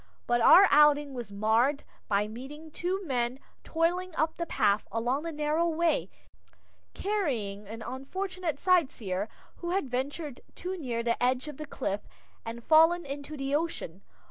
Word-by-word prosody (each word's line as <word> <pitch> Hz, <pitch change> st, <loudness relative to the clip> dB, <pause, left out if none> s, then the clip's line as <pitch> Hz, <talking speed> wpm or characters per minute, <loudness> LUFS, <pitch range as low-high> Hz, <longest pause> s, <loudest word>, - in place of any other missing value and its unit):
But 240 Hz, 0 st, +2 dB
our 380 Hz, +11 st, +9 dB
outing 295 Hz, -1 st, +5 dB
was 240 Hz, -5 st, -6 dB
marred 225 Hz, +8 st, +2 dB, 0.2 s
by 205 Hz, 0 st, +1 dB
meeting 280 Hz, +8 st, -9 dB
two 370 Hz, +5 st, -2 dB
men 250 Hz, -3 st, -1 dB, 0.3 s
toiling 350 Hz, +2 st, 0 dB
up 315 Hz, +1 st, 0 dB
the 340 Hz, -, -4 dB
path 205 Hz, -6 st, +1 dB
along 240 Hz, +5 st, 0 dB
the 330 Hz, +1 st, -4 dB
narrow 305 Hz, +2 st, +1 dB
way, 335 Hz, +8 st, +1 dB, 0.9 s
carrying 235 Hz, -, -2 dB
an 225 Hz, +2 st, -7 dB
unfortunate 335 Hz, -, -4 dB
sightseer 255 Hz, -, +1 dB, 0.3 s
who 345 Hz, -, -5 dB
had 350 Hz, -8 st, -1 dB
ventured 275 Hz, +2 st, -3 dB
too 365 Hz, +2 st, -4 dB
near 245 Hz, -9 st, -3 dB
the 235 Hz, 0 st, 0 dB
edge 250 Hz, +3 st, +1 dB
of 300 Hz, -3 st, -7 dB
the 305 Hz, -, -7 dB
cliff 205 Hz, -7 st, -3 dB, 0.4 s
and 230 Hz, +1 st, -7 dB
fallen 325 Hz, +3 st, +5 dB
into 285 Hz, +2 st, -6 dB
the 275 Hz, 0 st, -3 dB
ocean. 290 Hz, -, -2 dB
285 Hz, 150 wpm, -29 LUFS, 235-330 Hz, 0.9 s, our